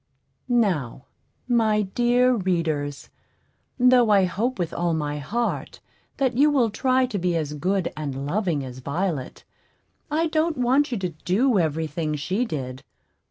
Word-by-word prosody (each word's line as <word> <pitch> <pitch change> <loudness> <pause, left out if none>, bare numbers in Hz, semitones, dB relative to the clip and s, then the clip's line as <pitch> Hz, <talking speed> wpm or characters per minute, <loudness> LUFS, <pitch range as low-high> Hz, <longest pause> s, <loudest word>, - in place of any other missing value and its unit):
Now, 180 - 0 0.4
my 220 -3 +2
dear 245 +5 +2
readers, 165 - -2 0.7
though 250 -2 +5
I 200 -2 +5
hope 220 +8 -1
with 175 -2 -3
all 170 -1 0
my 150 -1 -2
heart 230 - -3 0.4
that 260 -3 +1
you 290 +4 +5
will 255 -7 +2
try 255 +3 +2
to 225 -6 -3
be 175 -1 0
as 150 -3 -2
good 185 +5 -1
and 140 -3 -4
loving 165 -4 -1
as 130 0 -8
Violet, 145 0 -3 0.7
I 315 +3 +1
don't 315 0 0
want 260 +3 +2
you 240 - -1
to 185 -2 -2
do 195 - +1
every 160 -1 0
thing 155 0 -3
she 185 - -1
did. 130 - -5
190 Hz, 150 wpm, -24 LUFS, 155-245 Hz, 0.7 s, though